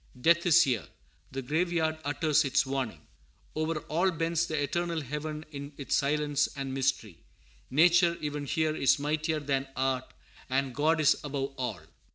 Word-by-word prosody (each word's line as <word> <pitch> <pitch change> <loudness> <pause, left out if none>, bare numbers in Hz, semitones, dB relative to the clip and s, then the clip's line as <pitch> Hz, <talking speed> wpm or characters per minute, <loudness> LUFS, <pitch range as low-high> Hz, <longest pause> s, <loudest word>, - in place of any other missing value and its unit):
Death 170 +6 +3
is 170 0 +7
here. 120 -9 -1 0.4
The 135 0 -5
graveyard 160 +2 0
utters 150 +1 +2
its 135 -1 +2
warning. 130 - -3 0.5
Over 155 0 -1
all 175 +5 +1
bends 165 -1 0
the 155 -2 -2
eternal 170 +3 -1
heaven 150 +3 -5
in 140 0 -7
its 140 - -1
silence 145 0 +1
and 135 -2 -4
mystery. 130 -9 -1 0.5
Nature, 170 +4 +4
even 150 -1 -4
here, 155 +1 0
is 135 - +3
mightier 155 +2 -1
than 135 -2 -1
Art, 130 -1 -1 0.4
and 135 0 0
God 155 +5 +2
is 145 - +4
above 140 -1 -3
all. 120 -8 -4
150 Hz, 155 wpm, -29 LUFS, 135-160 Hz, 0.5 s, is